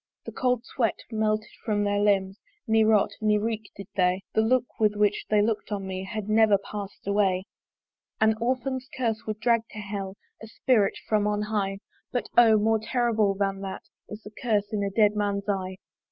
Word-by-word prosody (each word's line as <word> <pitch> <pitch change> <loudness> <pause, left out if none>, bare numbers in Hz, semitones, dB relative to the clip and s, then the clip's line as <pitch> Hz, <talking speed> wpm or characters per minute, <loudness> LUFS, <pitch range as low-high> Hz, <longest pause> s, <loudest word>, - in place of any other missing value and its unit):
The - - -6
cold 250 -2 0
sweat 235 -5 0 0.2
melted 215 -1 0
from 210 -2 0
their 205 0 +1
limbs, 200 -1 +1 0.3
Ne 220 -2 +4
rot, 215 -2 +3
ne 210 -1 +3
reek 220 0 -3
did 200 - -7
they; 185 0 +2
The 220 - +3
look 245 +2 +3 0.2
with 210 -1 +3
which 210 0 +1
they 210 -1 +4
look'd 220 0 -2
on 200 -2 -3
me, 190 0 -4
Had 215 0 -5
never 215 -1 +5
pass'd 200 0 -8
away. 195 -2 +1 0.8
An 220 0 +4
orphan's 255 +1 -1
curse 225 -4 -1
would 215 0 -3
drag 230 0 +3
to - - -9
Hell 200 -1 -5 0.2
A 220 - -8
spirit 220 -1 +1
from 210 -1 +2
on 210 0 0
high: 205 -2 -1 0.3
But 245 - -1
O! 225 -2 +7
more 220 +1 +2
horrible 220 -3 +1
than 195 0 -1
that 195 -1 -6 0.3
Is 210 +1 -8
the 210 - -10
curse 215 -3 -1
in 210 - 0
a 200 - 0
dead 210 +1 +3
man's 200 -1 -1
eye! 190 -2 -2
210 Hz, 190 wpm, -26 LUFS, 200-220 Hz, 0.8 s, O